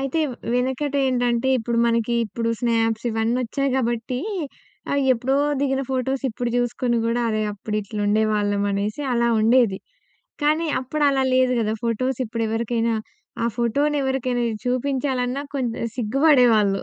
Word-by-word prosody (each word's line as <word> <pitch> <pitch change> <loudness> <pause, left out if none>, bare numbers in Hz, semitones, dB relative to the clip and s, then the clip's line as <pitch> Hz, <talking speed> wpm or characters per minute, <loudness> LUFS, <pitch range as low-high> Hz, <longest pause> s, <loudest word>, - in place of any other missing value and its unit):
అయితే 275 +4 -1 0.3
వెనకట 260 +3 -1
ఏంటంటే, 245 0 +1
ఇప్పుడు 235 +1 -1
మనకి 230 0 +1
ఇప్పుడు 230 +2 -3
స్నాప్స్ 225 -1 +1
ఇవన్నీ 225 +2 0
ఒచ్చాయి 275 +3 -1
కాబట్టి, 240 0 -1 0.7
ఆ! - - +1 0.2
ఎప్పుడో 255 +3 0 0.2
దిగిన 270 -1 0
ఫోటోస్ 265 +1 -1
ఇప్పుడు 235 +2 -3
చూసుకొని 240 0 0
కూడా 235 +1 0
అరే! 215 -1 0
అప్పుడు 210 +1 -4
ఇట్లుండేవాళ్ళం 205 0 0
అనేసి 210 +7 -2
అలా 235 0 +2
ఉండేది. 225 -3 +3 0.6
కానీ 310 +3 +2
అప్పుడు 280 +4 -3
అలా 270 -1 +1
లేదు 255 0 +3
కదా! 215 0 0
ఫోటోసు 240 +2 -1
ఇప్పుడు 230 +1 -2
ఎవరికైనా 230 +1 0 0.5
ఆ! - - +1
ఫోటోను 280 +6 +1
ఎవరికైనా 255 -2 -1 0.2
చూపించాలన్నా 255 0 -1
కొంత 245 -4 -1 0.2
సిగ్గుపడేవాళ్ళుం. 240 -5 +3
240 Hz, 130 wpm, -22 LUFS, 225-265 Hz, 0.7 s, ఉండేది